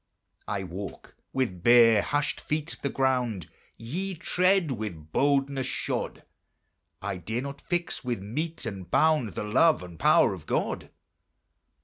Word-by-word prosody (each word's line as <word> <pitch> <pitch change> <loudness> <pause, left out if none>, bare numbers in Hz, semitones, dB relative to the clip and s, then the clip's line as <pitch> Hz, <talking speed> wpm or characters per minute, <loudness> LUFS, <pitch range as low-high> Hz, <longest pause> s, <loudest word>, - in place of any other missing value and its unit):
I 100 -2 -2
walk 95 +2 -8 0.2
with 115 -10 -1
bare, 115 -1 +7
hushed 145 +5 -1
feet 150 +1 -3
the 140 - -1
ground 125 - 0 0.3
Ye 180 +12 -4
tread 180 0 +2
with 95 -10 -5
boldness 140 - +1
shod; - - -3 0.8
I 95 -1 -2
dare 110 +8 -3
not 140 +1 -7
fix 175 -1 -2
with 120 -4 -2
mete 155 - -4
and 95 -5 -6
bound 150 - +3
The - - -2
love 130 - +3
and 85 -2 -11
power - - +5
of - - -10
God. - - -1
125 Hz, 135 wpm, -27 LUFS, 100-150 Hz, 0.8 s, bare